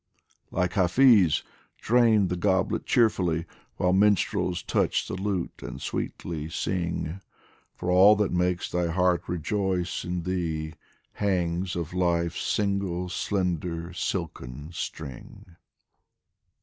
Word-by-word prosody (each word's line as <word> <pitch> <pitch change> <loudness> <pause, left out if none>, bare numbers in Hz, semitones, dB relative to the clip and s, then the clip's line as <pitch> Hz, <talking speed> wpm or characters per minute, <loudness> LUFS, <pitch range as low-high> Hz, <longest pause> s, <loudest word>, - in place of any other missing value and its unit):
Like 90 -1 -1
Hafiz, 95 - +5 0.3
drain 110 -5 +3
the 90 - -1
goblet 95 0 0
cheerfully 90 -8 +2 0.3
While 90 0 +2
minstrels 95 -2 +2
touch - - 0
the - - -5
lute 95 -2 -3
and 65 - -7
sweetly 80 +2 -4
sing, 85 0 -2 0.5
For 90 - -2
all 95 +4 +7
that 105 -1 0
makes 90 0 0
thy 90 -1 0
heart 90 +1 +2
rejoice 90 +1 -1
in 90 -1 -3
thee 80 -3 -2 0.4
Hangs 90 -2 -1
of 85 -1 -4
Life's 85 -2 0
single, 100 -3 -1
slender, 90 -3 -2
silken 80 -4 -4
string. 85 -1 -8
90 Hz, 110 wpm, -27 LUFS, 85-95 Hz, 0.5 s, all